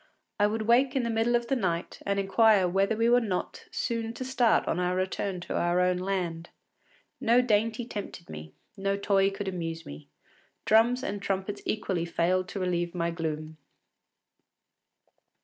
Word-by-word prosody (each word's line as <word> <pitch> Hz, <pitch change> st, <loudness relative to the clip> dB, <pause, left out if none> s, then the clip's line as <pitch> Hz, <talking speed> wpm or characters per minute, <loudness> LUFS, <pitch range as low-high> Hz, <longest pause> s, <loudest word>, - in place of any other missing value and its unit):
” -, -, -53 dB
I 205 Hz, -, +5 dB
would 220 Hz, +1 st, -2 dB
wake 250 Hz, +4 st, +3 dB
in 265 Hz, -, +1 dB
the 235 Hz, -, -1 dB
middle 225 Hz, +2 st, +2 dB
of 240 Hz, 0 st, +1 dB
the 270 Hz, -, 0 dB
night 175 Hz, -7 st, -2 dB
and 200 Hz, 0 st, +1 dB
inquire 195 Hz, 0 st, +4 dB
whether 195 Hz, +4 st, +1 dB
we 230 Hz, +1 st, +2 dB
were 245 Hz, +1 st, +5 dB
not 195 Hz, -6 st, -3 dB
soon 230 Hz, -1 st, -3 dB
to 255 Hz, -, -5 dB
start 245 Hz, -3 st, +2 dB
on 170 Hz, -, 0 dB
our 180 Hz, 0 st, 0 dB
return 185 Hz, 0 st, -2 dB
to -, -, -5 dB
our 175 Hz, +1 st, +1 dB
own 180 Hz, 0 st, +2 dB
land. 180 Hz, -3 st, -3 dB, 0.7 s
No 235 Hz, +2 st, +4 dB
dainty 230 Hz, -1 st, +1 dB
tempted 205 Hz, -6 st, -7 dB
me, 75 Hz, 0 st, -9 dB, 0.2 s
no 195 Hz, 0 st, -1 dB
toy 195 Hz, -1 st, +2 dB
could 195 Hz, 0 st, -6 dB
amuse 165 Hz, -3 st, -4 dB
me. 75 Hz, 0 st, -10 dB, 0.6 s
Drums 235 Hz, +4 st, +4 dB
and 205 Hz, -6 st, -3 dB
trumpets 195 Hz, +1 st, -3 dB
equally 190 Hz, -5 st, -1 dB
failed 180 Hz, +2 st, 0 dB
to 195 Hz, -, -5 dB
relieve 175 Hz, -1 st, -1 dB
my 170 Hz, -1 st, 0 dB
gloom. 155 Hz, -1 st, -4 dB
195 Hz, 170 wpm, -28 LUFS, 175-225 Hz, 0.7 s, I